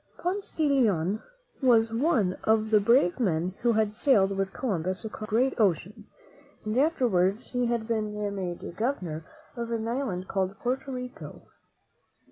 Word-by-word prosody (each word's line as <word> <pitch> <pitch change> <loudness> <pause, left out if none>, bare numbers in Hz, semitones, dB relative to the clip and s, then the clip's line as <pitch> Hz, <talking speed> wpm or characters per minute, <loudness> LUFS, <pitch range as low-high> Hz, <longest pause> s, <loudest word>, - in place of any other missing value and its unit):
Ponce 385 +3 -2
de 310 -2 +2
Leon 215 - +2 0.4
was 230 -3 +4
one 230 - +2
of 220 0 +2
the 215 - +6
brave 210 -3 +3
men 180 -5 0
who 235 0 +3
had 215 -1 +1
sailed 205 -7 +3
with 195 0 -1
Columbus 190 - -2
across 215 0 -6
the 215 - -1
great 260 +3 +3
ocean, 205 +2 0 0.6
and 215 +1 -2
afterwards 230 - +1
he 245 -1 0
had 235 -2 -1
been 215 -2 -1 0.2
made 175 -2 -5
Governor 185 - -2 0.3
of 235 -1 -4
an 225 -1 -2
island 230 -7 -2
called 190 0 -1
Porto 265 +3 -2
Rico. 250 -1 -7
220 Hz, 150 wpm, -27 LUFS, 190-245 Hz, 0.6 s, the